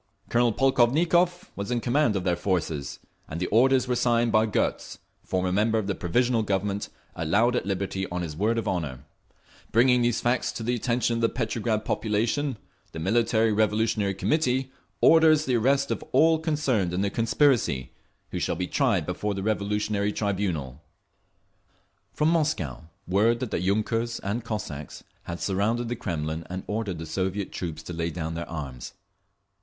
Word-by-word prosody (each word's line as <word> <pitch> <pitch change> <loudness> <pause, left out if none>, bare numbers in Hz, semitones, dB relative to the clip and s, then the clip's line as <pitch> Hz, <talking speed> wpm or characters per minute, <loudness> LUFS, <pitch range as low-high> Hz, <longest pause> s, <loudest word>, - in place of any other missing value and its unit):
Colonel 120 0 +3
Polkovnikov 160 +9 +2
was 100 +2 -5
in 120 -1 0
command 120 -1 +2
of 95 - -1
their 90 -2 +1
forces, 80 -6 -2 0.3
and 80 - -5
the 90 - -1
orders 130 +5 +3
were 125 - +1
signed 120 -1 +2
by 110 0 +3
Gotz, 105 - -1 0.3
former 90 -1 -1
member 110 +4 +2
of 110 - -1
the 100 - -1
Provisional 120 +7 +1
Government, 100 -1 -1 0.3
allowed 105 +10 +2
at 110 - -1
liberty 95 -1 -2
on 90 0 -3
his 75 -3 -5
word 110 +7 +1
of 115 -1 -2
honour…. 75 -10 -3 0.7
Bringing 125 +2 +4
these 120 -1 +1
facts 120 +1 0
to 115 - -5
the 120 +2 0
attention 120 0 0
of - - -2
the 115 - +3
Petrograd 110 -2 -2
population, 115 +5 0 0.4
the - - -6
Military 110 +4 +2
Revolutionary 105 -1 +1
Committee 130 - 0 0.3
orders 160 -1 +6
the 130 - 0
arrest 135 +4 +2
of - - -2
all 160 0 +5
concerned 140 - 0
in 95 - 0
the 100 0 0
conspiracy, 115 - +2 0.4
who - - -3
shall - - -1
be 90 +2 -2
tried 105 - +1
before 100 +4 -2
the 95 - -4
Revolutionary 105 0 0
Tribunal…. 90 - -2 1.3
From 155 +1 +1
Moscow, 145 - -1 0.2
word 110 +6 +3
that 125 -3 -4
the - - 0
yunkers 110 +4 0
and 105 +4 -2
Cossacks 85 - -6 0.2
had 85 0 -5
surrounded 110 +5 0
the 120 - -1
Kremlin 80 -5 -3
and 95 +1 -5
ordered 105 -4 -3
the 80 - -6
Soviet 95 +4 -2
troops 80 -3 -5
to 90 - -7
lay 85 0 -2
down 80 -1 -4
their 85 +1 -5
arms. 70 -6 -6
110 Hz, 165 wpm, -26 LUFS, 90-120 Hz, 1.3 s, orders